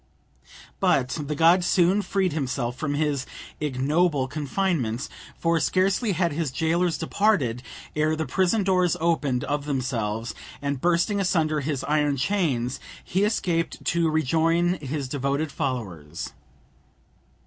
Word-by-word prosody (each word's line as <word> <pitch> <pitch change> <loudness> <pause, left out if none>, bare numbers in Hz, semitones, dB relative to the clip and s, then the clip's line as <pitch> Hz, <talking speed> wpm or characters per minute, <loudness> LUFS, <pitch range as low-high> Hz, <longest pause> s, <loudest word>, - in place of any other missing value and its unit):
But 130 -2 +2 0.2
the 150 - -2
god 170 +4 +5
soon 180 +3 +3
freed 190 -3 0
himself 125 -4 -2
from 145 +1 -2
his 145 -3 0 0.3
ignoble 145 +1 +1
confinement, 145 - -1 0.3
for 165 0 +1
scarcely 190 +6 +1
had 170 -1 +1
his 160 -1 -1
jailers 165 +5 +1
departed, 165 - +1 0.3
ere 155 +1 +2
the 160 0 -2
prison 185 - +1
doors 185 -3 +2
opened 150 -7 +1
of 145 0 -2
themselves, 120 -5 -2 0.3
and, 140 -2 -3
bursting 175 +4 +2
asunder 160 -5 +1
his 140 -2 -2
iron 150 -1 +1
chains, 135 -6 0 0.2
he 190 +3 0
escaped 175 -6 -1
to 170 -2 +2
rejoin 165 +3 +2
his 140 -1 -4
devoted 140 +3 -1
followers. 90 - -4
155 Hz, 125 wpm, -25 LUFS, 135-175 Hz, 0.3 s, god